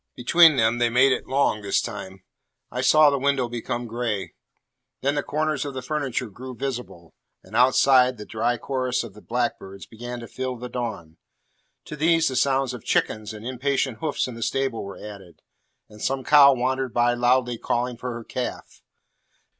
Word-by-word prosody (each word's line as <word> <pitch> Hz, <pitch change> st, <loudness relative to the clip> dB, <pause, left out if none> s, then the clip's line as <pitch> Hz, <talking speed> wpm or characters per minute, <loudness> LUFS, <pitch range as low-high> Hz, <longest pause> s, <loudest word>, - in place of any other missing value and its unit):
Between 160 Hz, +5 st, +6 dB
them 115 Hz, -1 st, +2 dB
they 120 Hz, 0 st, +3 dB
made 130 Hz, +3 st, +4 dB
it -, -, -1 dB
long 130 Hz, -5 st, +1 dB
this 100 Hz, -1 st, +1 dB
time. 95 Hz, -4 st, -7 dB, 0.5 s
I 125 Hz, -, -2 dB
saw 150 Hz, +3 st, +6 dB
the 140 Hz, -, 0 dB
window 140 Hz, -2 st, +1 dB
become 120 Hz, 0 st, -4 dB
gray; 115 Hz, -3 st, -3 dB, 0.7 s
then 140 Hz, +2 st, +1 dB
the 145 Hz, -, 0 dB
corners 155 Hz, -1 st, -1 dB
of 140 Hz, -2 st, -6 dB
the 130 Hz, -, -5 dB
furniture 135 Hz, -3 st, -2 dB
grow 130 Hz, +5 st, -9 dB
visible; 120 Hz, -10 st, -6 dB, 0.3 s
and -, -, -12 dB
outside, 130 Hz, 0 st, +4 dB
the 105 Hz, -, -8 dB
dry 115 Hz, +3 st, -1 dB
chorus 130 Hz, -1 st, -2 dB
of 115 Hz, -4 st, -10 dB
the 105 Hz, -, -14 dB
blackbirds 115 Hz, -5 st, -3 dB
began 120 Hz, +2 st, -8 dB
to 115 Hz, -, -8 dB
fill 130 Hz, +1 st, -4 dB
the 125 Hz, +1 st, -8 dB
dawn. 110 Hz, -10 st, -5 dB, 0.7 s
To -, -, -7 dB
these 165 Hz, +1 st, +3 dB
the 130 Hz, -, -5 dB
sounds 135 Hz, -1 st, +1 dB
of 125 Hz, -, -8 dB
chickens 110 Hz, 0 st, -1 dB
and 110 Hz, +1 st, -10 dB
impatient 130 Hz, -1 st, -1 dB
hoofs 155 Hz, -4 st, -1 dB
in 125 Hz, -, -7 dB
the 115 Hz, -, -9 dB
stable 135 Hz, 0 st, -1 dB
were 100 Hz, -, -8 dB
added, 100 Hz, -5 st, -11 dB, 0.4 s
and 105 Hz, -1 st, -15 dB
some 135 Hz, 0 st, -1 dB
cow 140 Hz, -2 st, +7 dB
wandered 130 Hz, 0 st, -2 dB
by 120 Hz, 0 st, +3 dB
loudly 120 Hz, 0 st, +1 dB
calling 125 Hz, +1 st, -1 dB
for 125 Hz, +2 st, -5 dB
her 120 Hz, -1 st, -6 dB
calf. 125 Hz, +2 st, -6 dB
125 Hz, 180 wpm, -24 LUFS, 115-135 Hz, 0.7 s, cow